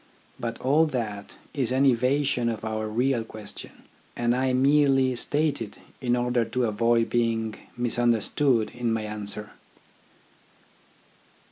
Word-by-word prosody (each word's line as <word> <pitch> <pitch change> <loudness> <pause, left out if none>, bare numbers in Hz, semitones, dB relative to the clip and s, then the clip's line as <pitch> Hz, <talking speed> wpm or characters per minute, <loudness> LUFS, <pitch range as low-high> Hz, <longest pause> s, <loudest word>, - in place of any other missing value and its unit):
But 115 -1 -4
all 150 +5 +3
that 110 -7 -4 0.2
is 130 -5 -1
an 130 +2 +3
evasion 130 0 +2
of 110 -1 -4
our 110 0 -2
real 120 +2 +1
question, 110 -2 -10 0.3
and 120 0 +1
I 130 0 +1
merely 135 -1 +3
state 145 +2 0
it 105 -2 -6 0.2
in 120 -2 +1
order 120 -1 +1
to 120 +3 -2
avoid 115 +1 +2
being 115 -2 0 0.2
misunderstood 120 +1 +1
in 120 -1 -1
my 110 -1 -1
answer. 105 0 -6
120 Hz, 125 wpm, -26 LUFS, 115-130 Hz, 0.3 s, all